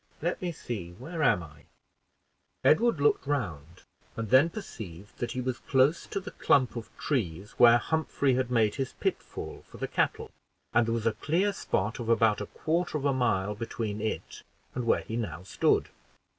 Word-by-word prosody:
Let 175 +3 -2
me 180 -1 -1
see, 100 - -6
where 160 - -6
am 90 - +3
I?" 75 -1 -14 1.0
Edward 230 +1 +4
looked 140 -1 +2
round, 85 - -3 0.3
and 115 -1 -4
then 135 +6 +7
perceived 105 - -9
that 120 - -2
he 125 - -2
was 125 0 -2
close 135 +4 +2
to - - -2
the 195 - -8
clump 130 -3 +2
of 115 -2 -6
trees 100 - -2
where 120 -1 +8
Humphrey 145 -1 0
had 125 0 0
made 115 -4 +3
his 135 -2 -2
pitfall - - -4
for - - -12
the - - -3
cattle, - - -1 0.4
and 115 - +4
there 115 - +1
was 115 -1 -3
a 115 - +4
clear 180 - +1
spot 105 - -1
of 115 -1 -4
about 110 -2 +3
a 105 - -4
quarter 165 0 -1
of 145 - -4
a 140 - +3
mile 105 -6 +1
between 110 -1 -4
it 110 - -4 0.3
and 125 -2 -3
where - - +3
he 110 - -6
now 90 -8 -3
stood. 95 - +2
120 Hz, 185 wpm, -29 LUFS, 105-145 Hz, 1.0 s, where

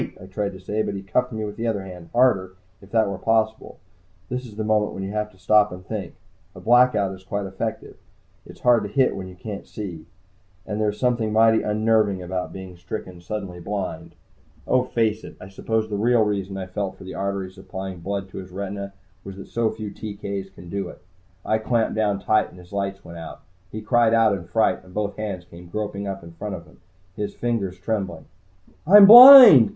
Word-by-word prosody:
I - - -10
tried 100 +1 -4
to 95 - -11
say, 105 +4 -3
but 100 - -3
he 100 - -6
cuffed 125 +6 -1
me 110 -1 -4
with 105 - -7
the 115 +1 -2
other 105 -4 -2
hand, 90 -3 -11
harder, 100 -7 +2 0.3
if 100 - -16
that 110 -2 +2
were 100 -1 -5
possible. 110 0 -1 0.5
This 125 +1 -4
is 105 - -13
the 110 - -3
moment 105 -1 +1
when 95 - -6
you 95 - -5
have 105 0 -3
to 95 - -23
stop 105 +2 +3
and 90 0 -10
think. 100 -6 -6 0.4
A - - -10
Blackout 120 -5 +3
is 95 - -17
quite 100 +1 -4
effective 95 0 -5 0.5
it's - - -15
hard 120 -2 +4
to 105 - -5
hit 130 +5 +1
what 95 -1 -6
you 90 - -12
can't 100 +2 -8
see. 90 -7 -7 0.6
And 105 0 -4
there's 105 -1 -1
something 120 -4 0
mighty 110 +1 +4
unnerving 105 -3 +1
about 90 0 -4
being 95 -1 -9
stricken 90 0 -8
suddenly 95 -1 -6
blind. 95 -3 -5 0.5
Oh, 130 -1 +2
face 110 -3 -1
it, - - -11
I 90 - -10
suppose 110 +3 -2
the 105 - -4
real 115 +2 +3
reason 100 -2 -3
I 95 - -5
felt 95 +1 -5
for - - -12
the 95 - -8
arteries 100 -1 -4
supplying 95 -1 -8
blood 95 +2 -5
to - - -7
his 95 -1 -10
retinas 100 +1 -6 0.3
was 95 - -9
that 95 - -10
so 115 -1 0
few 110 -2 -7
TK's 100 -2 -6
can 90 -2 -14
do 100 -1 -4
it. - - -13 0.5
I 110 - +1
clamped 115 0 0
down 105 -2 0
tight, 110 +2 +1
and - - -17
his 90 -1 -16
lights 100 -1 -4
went 85 0 -10
out. 80 - -10 0.3
He 110 - -6
cried 115 +1 +3
out 115 -2 +4
in 90 -4 -5
fright, 110 +6 +1
and 90 - -17
both 105 +1 -3
hands 100 -5 -5
came 85 0 -14
groping 100 +1 -4
up 95 -2 -6
in 85 0 -12
front 100 +4 -6
of 85 - -10
him, 80 - -21 0.4
his 105 -1 -5
fingers 110 -6 -2
trembling. 95 -6 -4 0.6
"I'm 200 +2 +10
blind!" 235 - +11
100 Hz, 215 wpm, -23 LUFS, 95-110 Hz, 0.6 s, blind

